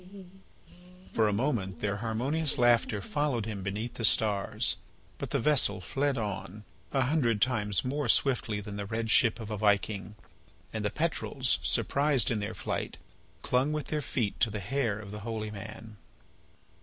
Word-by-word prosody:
For 110 -1 +3
a - - +2
moment 105 -5 -1
their 100 -1 -1
harmonious 130 +8 0
laughter 120 -4 +3
followed 140 -2 -1
him 105 -3 -5
beneath 105 +5 -3
the 115 - -6
stars, 105 -2 +2 0.4
but - - -4
the - - +1
vessel 140 -6 +3
fled 135 +9 -1
on, 105 -1 -4 0.3
a 135 - +2
hundred 125 -6 +1
times 105 -5 +1
more 140 0 -1
swiftly 115 -5 +2
than 105 0 -7
the 100 -1 -4
red 110 +1 -2
ship 115 -1 +5
of 110 -1 -6
a 105 - -2
Viking. 100 -1 +1 0.6
And - - -3
the - - +1
petrels, - - 0
surprised 140 -5 +2
in 110 - 0
their 105 - -4
flight, - - -3 0.5
clung 130 +4 +2
with 150 -1 -3
their 155 -1 -1
feet 115 -7 -2
to 115 - +3
the 105 0 -4
hair 115 +1 -1
of 105 -2 -9
the 105 - -6
holy 110 0 -4
man. 110 +1 -9
110 Hz, 165 wpm, -30 LUFS, 105-130 Hz, 0.6 s, ship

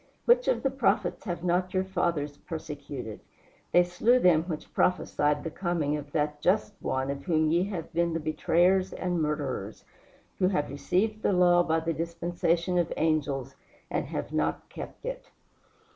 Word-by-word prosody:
Which 485 +1 +4
of - - +1
the 270 - +1
prophets 225 -8 0
have 175 -1 -4
not 180 +1 0
your 185 - +2
fathers 170 -6 -1
persecuted? 145 - -7 0.5
They 175 - +6
slew 180 +8 +3
them 175 -8 +4
which 160 -4 -6
prophesied 150 -5 +1
the 165 - -4
coming 165 -5 -1
of 145 -1 -6
that 150 -1 -1
Just 200 +4 +2
One 130 +1 -1
of 140 0 -6
whom 160 -3 +2
ye 175 +3 +3
have 180 -4 -5
been 170 0 +1
the 165 - -1
betrayers 175 +4 +2
and 175 -2 -1
murderers; 140 -9 -3 0.5
who 185 - +4
have 150 -8 0
received 195 +10 0
the 200 - +2
law 175 -1 +5
by 165 -1 +1
the 165 +1 -1
dispensation 170 +1 0
of 170 -1 0
angels 145 -4 0 0.4
and - - -1
have - - -4
not - - -1
kept - - -9
it." - - -5
170 Hz, 165 wpm, -28 LUFS, 150-180 Hz, 0.5 s, They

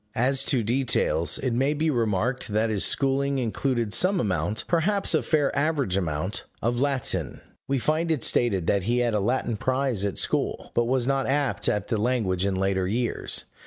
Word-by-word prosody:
As 135 +3 +2
to 125 -5 +1
details, 115 -7 +1
it 130 -3 -2
may 135 +5 +1
be 155 +1 +1
remarked 120 +1 0
that 110 +1 0
his 100 -3 0
schooling 140 0 +1
included 120 -2 -1
some 185 +7 +2
amount 95 - -1
perhaps 195 +4 +1
a - - +3
fair 150 -3 +1
average 140 - 0
amount 90 +1 -2 0.2
of 120 +2 -1
Latin. 140 -3 -1 0.3
We 135 - 0
find 155 +6 0
it 155 -7 0
stated 100 -8 +1
that 100 0 +1
he 120 +3 +1
had 120 -2 +1
a 105 - +1
Latin 115 +1 -1
prize 130 -4 -1
at 100 -2 -2
school, - - -1
but 120 - +2
was 125 0 0
not 135 0 0
apt 140 -1 0
at 105 -1 -2
the 110 - 0
language 105 -6 0
in 100 - -1
later 95 -1 0
years. 120 +4 -1
120 Hz, 185 wpm, -25 LUFS, 105-135 Hz, 0.3 s, a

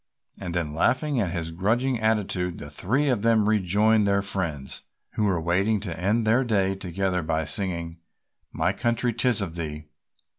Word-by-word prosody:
And 90 -3 -5
then 80 -4 -1
laughing 130 - +1
at 100 -6 0
his 85 -1 -3
grudging 115 +8 0
attitude 100 -5 0
the 75 - -8
three 125 - 0
of 125 -6 +1
them 110 -2 +3
rejoined 105 +1 +3
their 100 0 +2
friends, 85 -9 -2 0.3
who 105 - 0
were 95 -4 +1
waiting 95 +6 +1
to 90 -6 -4
end 105 +5 +1
their 115 +5 +3
day 100 -5 +1
together 95 0 -2
by 80 0 -1
singing 85 -1 -2 0.5
"My 90 +4 0
Country, 120 +3 0
'Tis 115 -2 +2
of 85 -4 -5
Thee." 75 -2 -5
95 Hz, 170 wpm, -25 LUFS, 85-110 Hz, 0.5 s, them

